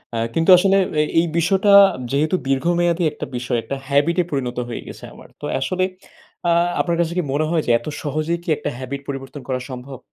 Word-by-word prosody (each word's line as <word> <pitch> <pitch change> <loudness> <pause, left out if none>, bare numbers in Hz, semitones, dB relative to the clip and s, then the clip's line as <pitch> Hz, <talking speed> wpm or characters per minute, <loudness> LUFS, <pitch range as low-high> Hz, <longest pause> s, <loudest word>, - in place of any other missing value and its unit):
আ - - -1 0.2
কিন্তু 165 +2 +1
আসলে 195 +2 +3 0.2
এ - - +3 0.2
এই 170 - +2
বিষয়টা 190 +4 +2 0.4
যেহেতু 155 +5 +1
দীর্ঘমেয়াদী 170 +5 +1
একটা 150 - -6
বিষয়, 120 0 -1
একটা 140 - -4
habit 145 +4 +2
এ - - 0
পরিণত 125 -4 -2
হয়ে 115 - -5
গেছে - - -10
আমার। - - -14
তো - - -5
আসলে 185 +8 -1 0.7
আ - - +4 0.3
আপনার 170 -1 -1
কাছে 170 0 -1
কি 180 - +1
মনে 155 +2 +1
হয় 165 -2 +1
যে 120 - +1
এত 120 - -13 0.2
সহজেই 155 +3 -1
কি 175 - -7
একটা - - -3
habit 135 +2 -5
পরিবর্তন 135 +1 -6
করা 130 -1 -1
সম্ভব? 130 +1 -8
150 Hz, 200 wpm, -20 LUFS, 135-170 Hz, 0.7 s, আ